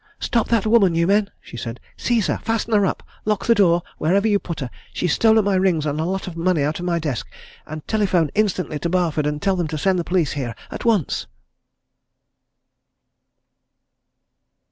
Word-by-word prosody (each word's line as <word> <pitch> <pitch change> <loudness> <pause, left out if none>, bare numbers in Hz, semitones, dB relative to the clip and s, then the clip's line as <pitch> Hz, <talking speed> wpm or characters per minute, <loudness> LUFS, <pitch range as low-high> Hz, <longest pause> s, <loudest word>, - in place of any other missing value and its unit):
"Stop 230 -2 0
that 230 -3 +1
woman, 215 -6 +4
you 170 0 +2
men!" 200 +2 +2
she - - -12
said. 115 0 -6 0.2
"Seize 235 -4 0
her! - - -1
Fasten 225 0 -2
her 205 -2 +4
up! - - -3 0.2
lock 210 -2 -1
the 235 - +5
door 175 -5 +3 0.2
wherever 195 +7 +2
you 205 -2 +3
put 170 -4 -6
her! 125 -3 -4 0.2
She's 180 -4 0
stolen 220 -2 +4
my 200 - +2
rings, 185 -5 +2
and 150 0 -2
a 160 - 0
lot 190 +2 -2
of 180 -4 -7
money 165 -2 +1
out 150 +3 -1
of 175 - -5
my 175 -1 +1
desk! 150 -8 -3 0.4
And 155 0 -8
telephone 185 -8 +1
instantly 185 -7 0
to 170 - -2
Barford, 165 -4 +1
and 150 0 -2
tell 195 +1 +1
them 175 -3 -1
to 155 0 -4
send 185 +4 +1
the - - -1
police 175 -3 0
here 125 -5 -4 0.2
at - - -6
once!" 215 - +1
180 Hz, 190 wpm, -21 LUFS, 155-205 Hz, 0.4 s, the